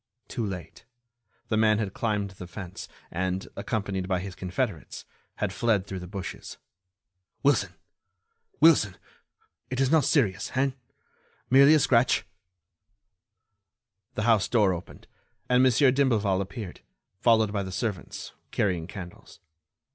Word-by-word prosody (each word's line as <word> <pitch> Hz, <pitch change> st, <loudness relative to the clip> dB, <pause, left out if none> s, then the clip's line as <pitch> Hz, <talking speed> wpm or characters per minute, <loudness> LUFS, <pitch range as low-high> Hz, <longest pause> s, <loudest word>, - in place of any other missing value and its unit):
Too 120 Hz, -, -3 dB
late—the 115 Hz, +4 st, -8 dB
man 110 Hz, -1 st, +4 dB
had 105 Hz, -3 st, -2 dB
climbed 105 Hz, -3 st, -1 dB
the 90 Hz, -1 st, -10 dB
fence 90 Hz, 0 st, -8 dB, 0.2 s
and, 95 Hz, +2 st, -2 dB
accompanied 100 Hz, -4 st, -2 dB
by 95 Hz, -2 st, 0 dB
his 95 Hz, 0 st, -6 dB
confederates, 90 Hz, -1 st, -4 dB, 0.3 s
had -, -, -2 dB
fled 110 Hz, -5 st, +1 dB
through 95 Hz, -2 st, -5 dB
the 90 Hz, -, -8 dB
bushes. 95 Hz, 0 st, -7 dB, 0.9 s
"Wilson, 145 Hz, 0 st, +2 dB, 0.8 s
Wilson, 115 Hz, -, +5 dB, 0.7 s
it 130 Hz, 0 st, -3 dB
is 135 Hz, 0 st, +2 dB
not 160 Hz, -2 st, +5 dB
serious, 105 Hz, -, +1 dB
hein? 135 Hz, +1 st, +2 dB, 0.8 s
Merely 140 Hz, +4 st, +8 dB
a -, -, +5 dB
scratch." 125 Hz, -2 st, +3 dB, 1.9 s
The 105 Hz, -, -1 dB
house 110 Hz, -3 st, +3 dB
door 105 Hz, -6 st, +3 dB
opened, 85 Hz, 0 st, -9 dB, 0.4 s
and 125 Hz, 0 st, +4 dB
Monsieur 130 Hz, +1 st, +5 dB
d'Imblevalle 110 Hz, -8 st, +2 dB
appeared, 100 Hz, -1 st, -7 dB, 0.4 s
followed 110 Hz, -3 st, +3 dB
by 100 Hz, -, 0 dB
the 95 Hz, -1 st, -5 dB
servants, 100 Hz, -2 st, -4 dB, 0.2 s
carrying 90 Hz, -5 st, 0 dB
candles. 90 Hz, -2 st, -10 dB
105 Hz, 125 wpm, -27 LUFS, 95-120 Hz, 1.9 s, Merely